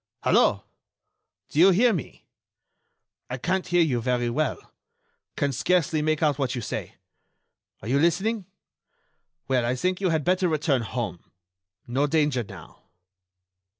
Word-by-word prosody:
Hello!... - - +3 0.9
Do 150 - -2
you 185 +3 +8
hear 225 +6 +4
me?... 165 - -6 1.0
I 125 - -3
can't 185 +8 -1
hear 175 -1 +3
you 125 -7 0
very 120 0 0
well.... 155 +5 0 0.8
Can 145 -3 +1
scarcely 160 +2 +1
make 155 +1 0
out 145 -2 +2
what 130 -2 -1
you 120 - -3
say.... - - -5 0.9
Are - - -6
you 135 +4 +2
listening? 190 +6 +1 1.0
Well, 130 -2 +1
I 120 +2 0
think 180 +8 -1
you 190 - +2
had 160 -2 0
better 185 +1 +2
return 150 -4 +1
home.... 110 -7 -4 0.6
No 135 +5 0
danger 150 -4 +1
now.... 100 - -13
150 Hz, 140 wpm, -25 LUFS, 125-175 Hz, 1.0 s, you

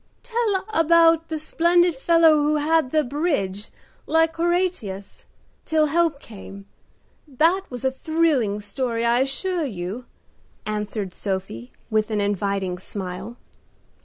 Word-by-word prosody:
"Tell 460 -5 -1
about 330 -1 +4
the 320 - -2
splendid 340 +2 +2
fellow 330 +4 +5
who 300 0 +2
held 305 -1 +2
the 310 +2 +2
bridge, 245 - -2 0.4
like 325 0 +2
Horatius, 340 - -2 0.4
till 315 -1 +2
help 320 -1 +1
came 200 -4 -11 0.7
up. 260 - -19
That 340 +6 +4
was 250 0 -5
a 265 - +2
thrilling 270 -8 0
story, 230 +2 -2
I 235 +1 +3
assure 330 +7 -1
you," 210 -1 -5 0.6
answered 210 -2 -3
Sophie, 190 - -5 0.2
with 215 0 +1
an 215 -1 -1
inviting 200 -2 -1
smile. 190 +4 -6
270 Hz, 125 wpm, -23 LUFS, 205-330 Hz, 0.7 s, fellow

